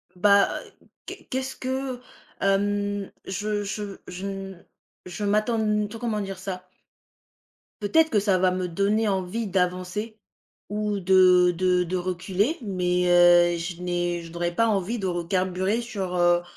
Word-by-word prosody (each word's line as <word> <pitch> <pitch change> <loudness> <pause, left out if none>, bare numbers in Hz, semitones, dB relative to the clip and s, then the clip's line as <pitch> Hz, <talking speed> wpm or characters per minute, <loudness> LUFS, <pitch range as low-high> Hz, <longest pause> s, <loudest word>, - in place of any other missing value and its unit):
Bah, 200 +2 +3
heu, - - -21 0.2
qu'est - - -9
qu'est-ce 260 +1 -3
que, 260 -1 -4 0.4
hem, 205 0 0
je 205 +2 -2
je 205 0 -5
je 185 +2 -7
n 195 -2 -7 0.4
je 180 +3 -6
m'attends 215 +3 +1
n 210 -1 +1
tout, 225 +2 -8
comment 220 -3 -2
dire 195 -2 -6
ça? 185 -1 -6 1.1
Peut-être 320 +10 +3
que 215 - +2
ça 195 -2 +2
va 185 0 +4
me 185 0 -2
donner 200 +5 +1
envie 195 +3 -1
d'avancer, 185 +4 -2 0.5
ou 210 0 -1
de 180 -1 +5
de 180 +1 +2
de 180 +1 -3
reculer, 185 - -1
mais 180 -3 0
heu, 175 0 +6
je 170 +1 -5
n'ai 175 -1 -1
je 165 - -11
n'aurais 175 0 -3
pas 230 +3 +3
envie 210 +2 0
de 200 - -4
recarburer 185 +4 -1
sur, 195 -6 -4
heu, 175 0 +3
195 Hz, 150 wpm, -25 LUFS, 180-210 Hz, 1.1 s, heu